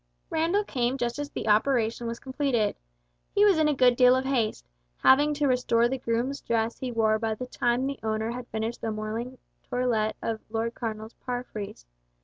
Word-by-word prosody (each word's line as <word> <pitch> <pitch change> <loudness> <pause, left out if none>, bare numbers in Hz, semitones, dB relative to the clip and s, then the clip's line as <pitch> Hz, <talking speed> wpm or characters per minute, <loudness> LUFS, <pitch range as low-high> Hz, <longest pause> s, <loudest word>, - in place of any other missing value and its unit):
Randall 340 +6 +2
came 250 -7 -1
just 240 +1 -2
as 290 0 -3
the - - -5
operation 230 +1 +2
was 230 0 -4
completed. 260 -5 0 0.6
He 410 - +6
was 390 -6 +5
in 310 - +4
a 300 - +2
good 250 -1 +5
deal 250 0 +6
of 260 +1 -1
haste, 235 - 0 0.4
having 290 +3 +6
to 290 0 0
restore 240 -2 +3
the 265 +2 -3
groom's 240 +3 -1
dress 230 0 -1
he 255 -1 -3
wore 220 -2 +2
by 220 -1 -1
the 250 - -5
time 245 0 0
the 275 0 -3
owner 220 +1 -1
had 245 0 -6
finished 220 +1 -4
the 225 - -2
morning 220 +4 -4 0.3
toilet 235 -4 0
of 225 -1 -3
the 215 - -25
Lord 230 +1 -1
Cardinal's 220 -2 -5
palfreys. 235 - -5
240 Hz, 190 wpm, -27 LUFS, 225-260 Hz, 0.6 s, He